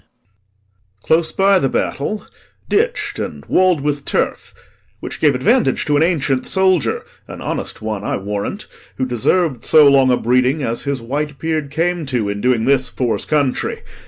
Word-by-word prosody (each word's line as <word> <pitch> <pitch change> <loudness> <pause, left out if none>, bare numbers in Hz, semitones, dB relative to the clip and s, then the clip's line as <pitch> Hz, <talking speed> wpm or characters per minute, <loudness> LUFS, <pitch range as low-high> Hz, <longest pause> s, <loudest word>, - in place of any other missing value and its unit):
POSTHUMUS. 100 0 -43
Close 160 0 +2
by 195 0 +3
the 135 - 0
battle, 205 +13 -2 0.4
ditch'd, 480 +4 0
and - - -6
wall'd 185 -5 +2
with 145 0 -2
turf, - - -2 0.5
Which - - -7
gave 145 -4 +3
advantage 230 - +2
to 150 - +1
an 145 - +3
ancient 145 -6 +1
soldier 190 -4 +1 0.2
An - - -9
honest - - -5
one, 110 -2 -3
I - - -1
warrant, 105 - -4 0.3
who 130 - 0
deserv'd 130 +3 0
So 155 -2 +6
long 135 -2 +5
a 125 - +3
breeding 125 +5 +1
as 115 +3 -2
his 140 -4 -2
white 145 +4 -3
beard 155 -2 -2
came 165 +1 -1
to, 120 -6 -1
In 100 0 -4
doing 125 -3 +1
this 130 -1 +2
for's 125 -3 -2
country. 145 -4 -1
140 Hz, 165 wpm, -18 LUFS, 120-160 Hz, 0.5 s, So